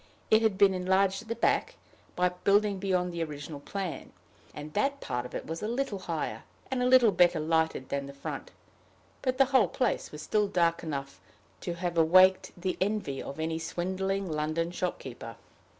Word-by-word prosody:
It 220 Hz, 0 st, +6 dB
had 220 Hz, -4 st, +2 dB
been 200 Hz, -1 st, +5 dB
enlarged 190 Hz, +2 st, +1 dB
at 225 Hz, -, -15 dB
the 230 Hz, -, -2 dB
back, -, -, +1 dB, 0.4 s
by 180 Hz, 0 st, +3 dB
building 200 Hz, +2 st, +2 dB
beyond 180 Hz, -2 st, 0 dB
the 170 Hz, -1 st, -1 dB
original 145 Hz, -1 st, -7 dB
plan, 190 Hz, +3 st, -5 dB, 0.4 s
and 150 Hz, 0 st, -9 dB
that 280 Hz, -, 0 dB
part 125 Hz, -, -3 dB
of -, -, -11 dB
it -, -, -4 dB
was 165 Hz, +1 st, -5 dB
a 210 Hz, -, -2 dB
little 240 Hz, -3 st, -2 dB
higher, 170 Hz, -4 st, -3 dB, 0.3 s
and 260 Hz, -1 st, 0 dB
a 250 Hz, -, +2 dB
little 250 Hz, -4 st, +6 dB
better 175 Hz, -3 st, +4 dB
lighted 160 Hz, -3 st, 0 dB
than 140 Hz, 0 st, -2 dB
the 140 Hz, -, -9 dB
front; 140 Hz, -, -6 dB, 0.7 s
but 255 Hz, -1 st, -1 dB
the 270 Hz, -, +6 dB
whole 245 Hz, -7 st, +6 dB
place 240 Hz, +2 st, -1 dB
was 150 Hz, 0 st, -8 dB
still 210 Hz, -1 st, +1 dB
dark 170 Hz, -3 st, +1 dB
enough 140 Hz, -4 st, -5 dB, 0.4 s
to 175 Hz, -, -4 dB
have 170 Hz, -1 st, -1 dB
awaked 185 Hz, +3 st, +5 dB
the 185 Hz, +1 st, -2 dB
envy 195 Hz, -9 st, -1 dB
of 140 Hz, -, -7 dB
any 160 Hz, 0 st, -1 dB
swindling 190 Hz, +4 st, -2 dB
London 155 Hz, +2 st, -1 dB
shopkeeper. 130 Hz, -, -5 dB
180 Hz, 180 wpm, -29 LUFS, 160-200 Hz, 0.7 s, It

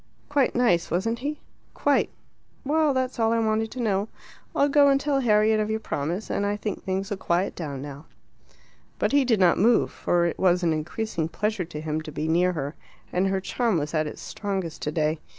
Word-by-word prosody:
"Quite 285 Hz, -3 st, +2 dB
nice, 230 Hz, -9 st, +2 dB
wasn't 225 Hz, +6 st, -1 dB
he?" 295 Hz, +4 st, -4 dB, 0.3 s
"Quite." -, -, +2 dB, 0.6 s
"Well, 305 Hz, +1 st, +3 dB
that's 260 Hz, -1 st, -1 dB
all 225 Hz, 0 st, +3 dB
I 230 Hz, -, +2 dB
wanted 220 Hz, 0 st, +1 dB
to 255 Hz, -, -8 dB
know. 205 Hz, -3 st, 0 dB, 0.5 s
I'll 280 Hz, -, +4 dB
go 285 Hz, 0 st, +5 dB
and 275 Hz, 0 st, +4 dB
tell 280 Hz, -1 st, +1 dB
Harriet 215 Hz, -3 st, +3 dB
of 215 Hz, 0 st, 0 dB
your 220 Hz, 0 st, 0 dB
promise, 170 Hz, +2 st, -3 dB
and -, -, 0 dB
I 205 Hz, 0 st, 0 dB
think 210 Hz, -1 st, -4 dB
things'll 195 Hz, +1 st, -2 dB
quiet 180 Hz, +1 st, 0 dB
down 140 Hz, -5 st, -5 dB
now." 145 Hz, +2 st, -9 dB, 0.9 s
But -, -, 0 dB
he 285 Hz, 0 st, +4 dB
did 235 Hz, -5 st, +2 dB
not 180 Hz, -3 st, +4 dB
move, 230 Hz, +5 st, +4 dB
for 175 Hz, -1 st, +1 dB
it 170 Hz, -, -2 dB
was 180 Hz, -1 st, +3 dB
an 165 Hz, -2 st, +2 dB
increasing 165 Hz, +2 st, -2 dB
pleasure 210 Hz, -1 st, -1 dB
to 160 Hz, -2 st, -7 dB
him 155 Hz, 0 st, -2 dB
to 155 Hz, -, -8 dB
be 155 Hz, +1 st, -3 dB
near 180 Hz, +3 st, +3 dB
her, 145 Hz, -2 st, -3 dB, 0.4 s
and 185 Hz, +2 st, +2 dB
her 195 Hz, 0 st, 0 dB
charm 225 Hz, +1 st, 0 dB
was 150 Hz, 0 st, -3 dB
at 155 Hz, -1 st, +1 dB
its -, -, -8 dB
strongest 190 Hz, -6 st, -4 dB
today. 155 Hz, +1 st, 0 dB
195 Hz, 205 wpm, -25 LUFS, 165-230 Hz, 0.9 s, go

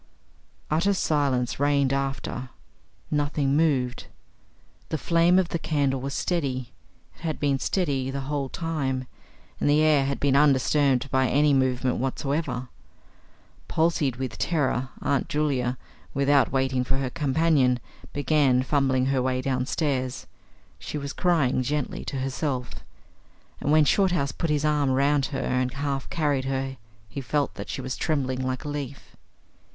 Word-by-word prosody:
Utter 180 Hz, +6 st, +2 dB
silence 140 Hz, -8 st, 0 dB
reigned 140 Hz, -1 st, +2 dB
after. 135 Hz, -2 st, -3 dB, 0.6 s
Nothing 145 Hz, -1 st, +1 dB
moved. 135 Hz, -6 st, +1 dB, 0.8 s
The 160 Hz, -, -1 dB
flame 170 Hz, +3 st, +3 dB
of 185 Hz, -2 st, +2 dB
the 170 Hz, -, -2 dB
candle 140 Hz, -5 st, 0 dB
was 140 Hz, +1 st, -4 dB
steady. 130 Hz, -, -2 dB, 0.4 s
It -, -, -22 dB
had 160 Hz, -2 st, -3 dB
been 140 Hz, -2 st, +1 dB
steady 140 Hz, -9 st, 0 dB
the 135 Hz, +1 st, -3 dB
whole 140 Hz, 0 st, -2 dB
time, 140 Hz, -6 st, -2 dB, 0.5 s
and -, -, +1 dB
the 150 Hz, +1 st, +4 dB
air 150 Hz, -3 st, +4 dB
had 140 Hz, 0 st, -2 dB
been 140 Hz, -1 st, +2 dB
undisturbed 140 Hz, -1 st, +3 dB
by 130 Hz, -1 st, +3 dB
any 145 Hz, +3 st, +3 dB
movement 130 Hz, -1 st, +1 dB
whatsoever. 135 Hz, 0 st, -2 dB, 1.0 s
Palsied 160 Hz, -5 st, +1 dB
with 130 Hz, -2 st, -5 dB
terror, 130 Hz, -6 st, 0 dB
Aunt 140 Hz, -2 st, 0 dB
Julia, 135 Hz, -4 st, 0 dB, 0.4 s
without 140 Hz, 0 st, +3 dB
waiting 130 Hz, -1 st, +1 dB
for 135 Hz, +1 st, -1 dB
her 135 Hz, -2 st, -2 dB
companion, 145 Hz, -4 st, +2 dB, 0.3 s
began 140 Hz, -3 st, +2 dB
fumbling 130 Hz, -2 st, +2 dB
her 135 Hz, -1 st, +1 dB
way 130 Hz, 0 st, 0 dB
downstairs; 130 Hz, 0 st, -1 dB, 0.5 s
she -, -, -5 dB
was 140 Hz, -1 st, -5 dB
crying 155 Hz, -8 st, +2 dB
gently 145 Hz, +2 st, -2 dB
to -, -, -4 dB
herself, 130 Hz, -1 st, -2 dB, 0.9 s
and 145 Hz, -, -1 dB
when 155 Hz, -1 st, +6 dB
Shorthouse 175 Hz, -4 st, +2 dB
put 165 Hz, -, -3 dB
his 150 Hz, 0 st, +1 dB
arm 150 Hz, -2 st, +2 dB
round 140 Hz, +1 st, +2 dB
her 140 Hz, -, -4 dB
and 125 Hz, -1 st, 0 dB
half 140 Hz, 0 st, -3 dB
carried 145 Hz, -5 st, 0 dB
her 135 Hz, 0 st, -2 dB, 0.3 s
he 140 Hz, -, -6 dB
felt 145 Hz, +2 st, -1 dB
that -, -, -8 dB
she 135 Hz, -, -4 dB
was 130 Hz, 0 st, -4 dB
trembling 130 Hz, -5 st, -1 dB
like 130 Hz, +1 st, -2 dB
a -, -, -4 dB
leaf. 140 Hz, -2 st, -6 dB
140 Hz, 145 wpm, -26 LUFS, 130-150 Hz, 1.0 s, when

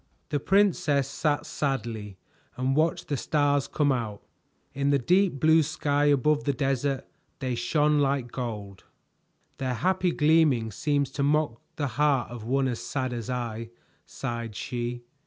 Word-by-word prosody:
The 145 Hz, -2 st, 0 dB
princess 160 Hz, -7 st, +2 dB
sat 145 Hz, +1 st, -1 dB
sadly 115 Hz, -8 st, -3 dB, 0.4 s
and 130 Hz, +1 st, 0 dB
watched 160 Hz, +2 st, +1 dB
the 145 Hz, -, -1 dB
stars 145 Hz, 0 st, +1 dB
come 145 Hz, -2 st, +1 dB
out. 110 Hz, -5 st, -3 dB, 0.5 s
In 140 Hz, +1 st, 0 dB
the 140 Hz, -, +4 dB
deep 180 Hz, +2 st, +2 dB
blue 160 Hz, +3 st, +5 dB
sky 145 Hz, -1 st, 0 dB
above 145 Hz, +1 st, +3 dB
the 140 Hz, -, +1 dB
desert 135 Hz, 0 st, -1 dB, 0.3 s
they 130 Hz, -2 st, -2 dB
shone 150 Hz, +5 st, +2 dB
like 135 Hz, -3 st, 0 dB
gold. 105 Hz, -6 st, -5 dB, 0.8 s
"Their 130 Hz, -2 st, -1 dB
happy 180 Hz, +7 st, +1 dB
gleaming 150 Hz, -8 st, +3 dB
seems 140 Hz, +4 st, 0 dB
to 145 Hz, -, -3 dB
mock 145 Hz, -4 st, +1 dB
the 150 Hz, -, -1 dB, 0.2 s
heart 140 Hz, -6 st, +2 dB
of 120 Hz, -3 st, -7 dB
one 135 Hz, +3 st, +1 dB
as 120 Hz, -3 st, -3 dB
sad 130 Hz, -2 st, -2 dB
as 120 Hz, 0 st, -5 dB
I," 115 Hz, -2 st, -3 dB, 0.4 s
sighed 115 Hz, -4 st, -5 dB
she. 120 Hz, +3 st, -4 dB
135 Hz, 150 wpm, -27 LUFS, 120-150 Hz, 0.8 s, blue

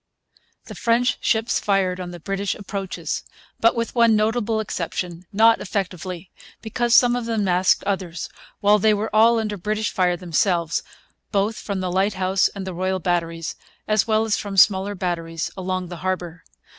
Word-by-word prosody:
The -, -, -9 dB
French 240 Hz, +2 st, +1 dB
ships 225 Hz, 0 st, +1 dB
fired 190 Hz, -2 st, +1 dB
on 180 Hz, -1 st, -5 dB
the 175 Hz, 0 st, -9 dB
British 195 Hz, +3 st, -2 dB
approaches; 195 Hz, -2 st, -4 dB, 0.4 s
but, 230 Hz, +2 st, +4 dB
with 230 Hz, 0 st, -2 dB
one 235 Hz, -2 st, +4 dB
notable 220 Hz, +1 st, +1 dB
exception, 180 Hz, -3 st, -4 dB
not 225 Hz, +3 st, +4 dB
effectively, 185 Hz, -2 st, -4 dB, 0.3 s
because 235 Hz, +2 st, 0 dB
some 245 Hz, -1 st, +6 dB
of 245 Hz, -1 st, -3 dB
them 225 Hz, -2 st, 0 dB
masked 185 Hz, -1 st, +2 dB
others, 185 Hz, -4 st, -3 dB, 0.3 s
while 205 Hz, +1 st, +5 dB
they 215 Hz, +1 st, +4 dB
were 215 Hz, +1 st, -3 dB
all 230 Hz, +2 st, +6 dB
under 215 Hz, -2 st, -2 dB
British 215 Hz, +3 st, -2 dB
fire 180 Hz, -1 st, +1 dB
themselves, 170 Hz, -1 st, 0 dB, 0.5 s
both 210 Hz, +2 st, 0 dB
from 200 Hz, -2 st, -4 dB
the 180 Hz, -1 st, -2 dB
Lighthouse 190 Hz, 0 st, +2 dB
and 195 Hz, -2 st, -7 dB
the 190 Hz, -, -5 dB
Royal 185 Hz, +2 st, -1 dB
Batteries, 165 Hz, -2 st, -2 dB, 0.3 s
as 215 Hz, 0 st, +2 dB
well 220 Hz, 0 st, +2 dB
as 220 Hz, -, +1 dB
from 200 Hz, -1 st, -5 dB
smaller 195 Hz, +1 st, +4 dB
batteries 165 Hz, -3 st, -3 dB
along 185 Hz, -1 st, -3 dB
the 175 Hz, -, -7 dB
harbour. 175 Hz, -1 st, -3 dB
195 Hz, 165 wpm, -22 LUFS, 180-215 Hz, 0.5 s, some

